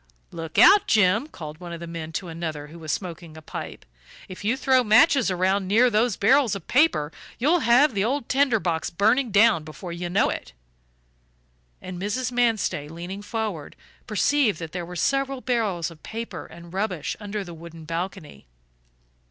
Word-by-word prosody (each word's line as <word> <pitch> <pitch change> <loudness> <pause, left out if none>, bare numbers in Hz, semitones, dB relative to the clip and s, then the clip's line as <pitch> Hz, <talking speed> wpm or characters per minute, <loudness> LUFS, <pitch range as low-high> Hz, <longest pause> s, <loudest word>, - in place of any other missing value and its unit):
"Look 165 -2 -7
out, 405 +1 +7
Jim," 215 +5 +3
called 155 - -9
one 175 -1 -8
of 170 - -7
the 170 - -7
men 165 -1 -6
to 180 +4 -4
another 160 -3 -5
who 170 +2 -12
was 155 -1 -4
smoking 170 -3 -6
a - - -10
pipe, - - -8 0.4
"if 185 +1 -10
you 230 +5 +1
throw 260 -1 +3
matches 250 +3 +5
around 185 +1 +1
near 235 +5 +4
those 220 0 +1
barrels 250 0 +3
of 195 - -9
paper 250 - +2 0.3
you'll 310 +8 +3
have 250 +3 +4
the 200 -1 0
old 255 +2 -1
tinder 265 -4 +2
box 165 -2 -1
burning 225 +8 +2
down 205 -5 +4
before 160 +3 -9
you 175 +1 -4
know 185 - +2
it." 60 - -7 1.3
And 185 -1 -7
Mrs. 250 +5 -2
Manstey, 225 -11 0
leaning 175 +5 -7
forward, 205 -7 -4 0.3
perceived 225 - +2
that 165 -1 -7
there 175 -2 -5
were 180 - -8
several 275 - 0
barrels 210 -10 -1
of 160 - -15
paper 230 +1 -7
and 170 0 -13
rubbish 185 -5 -2
under 205 -1 -4
the 175 -2 -9
wooden 165 0 -11
balcony. 165 - -6
195 Hz, 175 wpm, -24 LUFS, 170-235 Hz, 1.3 s, out